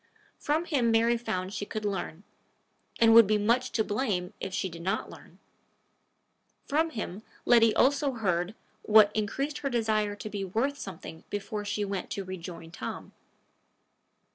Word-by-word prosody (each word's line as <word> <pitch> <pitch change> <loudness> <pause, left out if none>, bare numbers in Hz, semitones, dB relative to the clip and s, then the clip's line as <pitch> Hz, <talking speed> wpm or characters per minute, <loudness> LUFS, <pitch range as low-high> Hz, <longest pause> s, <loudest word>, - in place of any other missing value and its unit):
From 310 +3 0
him 270 -8 +1
Mary 230 +1 +3
found 190 -5 -3
she 205 - -3
could 215 +1 -5
learn, 195 -3 -3 0.8
and 225 -1 +6
would 230 -2 +9
be 215 +1 +3
much 235 +5 +1
to 220 - +2
blame 205 -5 -2
if - - -4
she 190 0 -1
did 170 -2 -9
not 190 +3 -2
learn. - - -15 1.3
From 320 +3 +1
him 215 - -5 0.2
Letty 230 -2 +5
also 280 +1 +3
heard 190 -3 -1 0.3
what 210 -1 +6
increased 270 +8 -2
her 280 - -2
desire 215 -4 0
to 205 - -7
be 205 -1 -4
worth 235 +10 -1
something 165 -4 -8
before 205 +1 -4
she 205 0 -1
went 195 -2 -4
to 195 - -4
rejoin 170 -3 -8
Tom. - - -7
215 Hz, 155 wpm, -29 LUFS, 190-235 Hz, 1.3 s, would